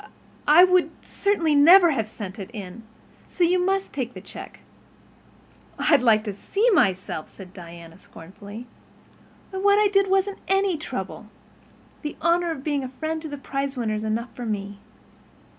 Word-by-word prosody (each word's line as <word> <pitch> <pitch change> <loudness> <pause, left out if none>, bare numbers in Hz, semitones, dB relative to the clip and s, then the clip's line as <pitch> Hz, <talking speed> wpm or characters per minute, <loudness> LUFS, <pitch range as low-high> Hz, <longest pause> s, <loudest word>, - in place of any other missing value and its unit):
I—I 310 +4 +8
would 365 -1 +4
certainly 340 -6 0
never 340 +4 +7
have 225 -6 -2
sent 205 -1 -8
it. 195 +1 -7 0.8
So 360 - -1
you 360 +1 +3
must 390 +1 -1
take 250 -3 -4
the - - -7
check." - - -11 1.2
"I'd 290 -5 +3
like 220 -3 +4
to 210 -2 -4
see 405 - -1
myself," 190 - +1
said 185 -2 -13
Diana 170 -2 -12
scornfully. 200 +7 -11 0.9
"Why, 380 - -4
what 405 +1 +4
I 420 -1 +4
did 395 -1 +2
wasn't 390 +1 +1
any 390 -1 +2
trouble. 315 - -6 0.7
The 295 - -5
honor 340 +1 +2
of 300 -5 -5
being 290 -2 -1
a 260 - -5
friend 315 +4 -4
of 315 - -6
the 290 - -6
prizewinner 275 -5 -3
is 215 0 -3
enough 225 +3 -3
for 245 -2 -6
me. 200 -1 -4
285 Hz, 160 wpm, -24 LUFS, -, 1.2 s, I—I